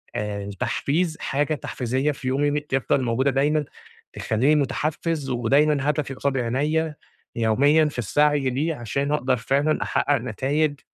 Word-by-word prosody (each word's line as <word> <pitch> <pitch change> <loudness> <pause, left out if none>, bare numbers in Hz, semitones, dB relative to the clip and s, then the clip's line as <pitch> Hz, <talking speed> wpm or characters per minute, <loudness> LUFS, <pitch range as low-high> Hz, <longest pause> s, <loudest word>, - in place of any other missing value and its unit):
آآ 100 -1 -3
تحفيز 160 +3 0
حاجة 145 +3 -1
تحفيزية 130 +2 -2
في 135 -2 -7
يومي 145 +2 +1
م 150 - 0
تفضل 135 -2 0
موجودة 130 +4 +1
دايمًا، 145 +3 +1 0.5
تخلّيني 130 +8 +1
متحفز 150 +2 -2
ودايمًا 140 +4 +2
هدفي 150 -3 -1
قصاد 135 0 -1
عينيّا 150 +6 0 0.4
يوميًا 140 +8 +3
في 145 -4 -3
السعي 145 +4 +2
ليه 155 +6 -1
عشان 140 +4 -2
أقدر 130 -4 +1
فعلًا 140 +6 +1
أحقق 145 0 +1
نتايج، 140 +5 -1
140 Hz, 135 wpm, -23 LUFS, 130-150 Hz, 0.5 s, يوميًا